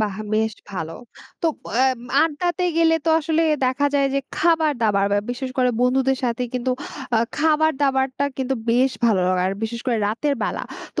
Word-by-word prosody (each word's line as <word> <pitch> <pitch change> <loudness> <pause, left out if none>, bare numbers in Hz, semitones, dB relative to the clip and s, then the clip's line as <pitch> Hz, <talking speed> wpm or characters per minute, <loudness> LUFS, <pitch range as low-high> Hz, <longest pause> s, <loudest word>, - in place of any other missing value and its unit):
বাহ! 205 -3 -1 0.2
বেশ 220 0 +1 0.2
ভালো। 165 -4 -4 0.5
তো - - +2 0.4
এব 255 - -4 0.2
আড্ডাতে 345 +3 -1
গেলে 330 -1 +4
তো - - 0
আসলে 320 +1 +1 0.2
দেখা 260 +3 +1
যায় 280 -1 +3
যে - - +3 0.2
খাবার-দাবার 290 -12 +2
বা 205 - +3
বিশেষ 255 +1 -4
করে 250 -1 +4
বন্ধুদের 265 +1 +2
সাথে 240 0 -1
কিন্তু 250 +1 -1 0.5
আ - - +4 0.2
খাবার-দাবারটা 285 -4 +1
কিন্তু 265 0 -1 0.2
বেশ 255 +3 +3
ভালো 215 -5 +3
লাগে 185 -1 +1
আর 190 - 0
বিশেষ 230 +1 -3
করে 245 -2 +1
রাতের 265 +8 0
বেলা। - - -2 0.3
তো - - 0
260 Hz, 170 wpm, -22 LUFS, 230-295 Hz, 0.5 s, গেলে